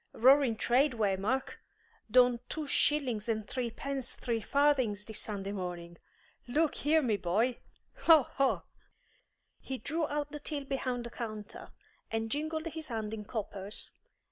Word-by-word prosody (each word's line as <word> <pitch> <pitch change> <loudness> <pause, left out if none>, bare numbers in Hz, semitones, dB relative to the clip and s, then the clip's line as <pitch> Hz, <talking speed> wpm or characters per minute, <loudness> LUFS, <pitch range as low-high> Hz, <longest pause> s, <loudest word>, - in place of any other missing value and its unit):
Roaring 260 0 +5
trade, 255 +5 +3
Waymark! 215 +4 0 0.5
Done 245 +1 +5
two 310 -1 -3
shillings 260 -6 +1
and 215 -2 -1
threepence 255 +2 -3
three 230 -2 -2
farthings 255 -6 +2
this 220 - -4
Sunday 200 -2 -3
morning. 175 -3 -5 0.5
Look 300 +4 +2
here, 310 +2 +2
me 220 -5 +2
boy, 220 +8 +1 0.4
ho, 320 -4 +7
ho!" 270 +2 0 1.0
He 265 - -5
drew 315 +4 -1
out 295 0 -2
the 295 - -6
till 290 -1 -4
behind 255 -3 -2
the 235 - -7
counter, 215 -4 -7 0.4
and 225 0 -2
jingled 315 +2 -2
his 320 -1 -4
hand 220 -3 -3
in 210 -1 -5
coppers. 205 -2 -3
245 Hz, 140 wpm, -32 LUFS, 215-285 Hz, 1.0 s, ho